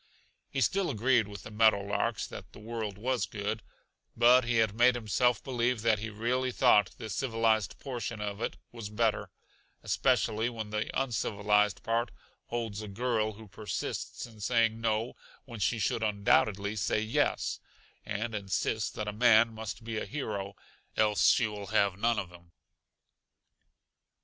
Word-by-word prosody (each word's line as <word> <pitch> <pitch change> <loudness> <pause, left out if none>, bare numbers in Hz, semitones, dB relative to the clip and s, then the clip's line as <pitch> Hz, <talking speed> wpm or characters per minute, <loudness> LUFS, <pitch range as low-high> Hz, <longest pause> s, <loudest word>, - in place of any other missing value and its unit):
He 135 - -2
still 195 +6 +2
agreed 120 -2 +2
with 100 -2 -9
the - - -9
meadow 110 -1 +4
larks 100 +1 -1
that - - -10
the - - -12
world 110 -2 -5
was 125 +3 -1
good, 105 +1 -3 0.6
but 120 +2 +6
he 120 0 0
had 110 -3 +3
made 120 +3 +4
himself 120 +1 +1
believe 120 -3 0
that 110 -2 +3
he 110 +1 -4
really 120 +4 -1
thought 105 -7 +4
the 110 - -6
civilized 115 -1 0
portion 120 -4 -5
of 105 0 -4
it - - -2
was 115 -3 -7
better, 110 0 0 0.5
especially 115 -2 +1
when 110 -3 -6
the 105 0 -2
uncivilized 105 -5 +1
part 115 +1 0 0.4
holds 115 -3 -3
a 105 - -6
girl 110 +1 -1
who 110 +1 -13
persists 105 0 -5
in 115 -3 -15
saying 115 0 +1
no 115 +1 0 0.3
when 120 -4 -9
she 105 +4 +1
should 110 +2 0
undoubtedly 100 -1 +2
say 100 0 0
yes, 110 +1 0 0.4
and 110 +2 -3
insists 105 +2 -1
that 105 - -5
a 105 - -2
man 115 0 +5
must 110 0 -6
be 115 -1 -3
a - - -4
hero, 100 -8 -4 0.4
else 105 -1 +3
she 120 - +5
will 105 -2 -5
have 100 -2 +2
none 115 +1 +2
of 90 -4 -3
him. 85 -1 -16
110 Hz, 160 wpm, -30 LUFS, 105-120 Hz, 0.6 s, but